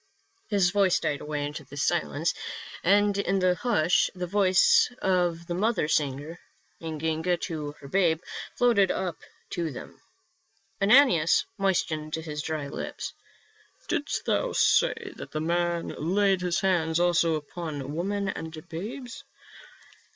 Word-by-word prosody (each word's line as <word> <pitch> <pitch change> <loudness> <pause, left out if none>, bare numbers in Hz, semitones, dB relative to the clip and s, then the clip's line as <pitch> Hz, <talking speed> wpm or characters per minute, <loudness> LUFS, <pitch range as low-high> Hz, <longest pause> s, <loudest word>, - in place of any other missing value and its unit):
His 195 -4 +3
voice 195 -3 +3
died 145 - -2
away 150 -1 -3
into 150 +1 -6
silence, 75 - 0 0.5
and 205 +2 +4
in 195 -1 +1
the 185 -1 +3
hush 180 -5 +2
the 180 -1 -3
voice 185 +4 +4
of 175 -3 +1
the 175 - -4
mother 210 -2 +1
singing 150 +2 -1 0.4
to 160 0 -2
her 140 - -13
babe 165 0 +2 0.4
floated 230 -6 +4
up 180 -3 -2 0.3
to 170 -5 -2
them. 125 - -10 0.8
Ananias 195 - +5
moistened 160 -5 0
his 155 -2 -5
dry 155 -2 -3
lips. - - -5 0.4
" - - -31
Didst - - -1
thou - - 0
say - - +2
that - - -8
the 155 - -1
man 170 +1 0
laid 190 +3 +1
his 180 0 0
hand 170 -4 +1
also 170 -2 +3
upon 150 -2 -5
women 200 +4 -2
and 160 -2 -6
babes?" 230 - -7
170 Hz, 130 wpm, -27 LUFS, 155-190 Hz, 0.8 s, Ananias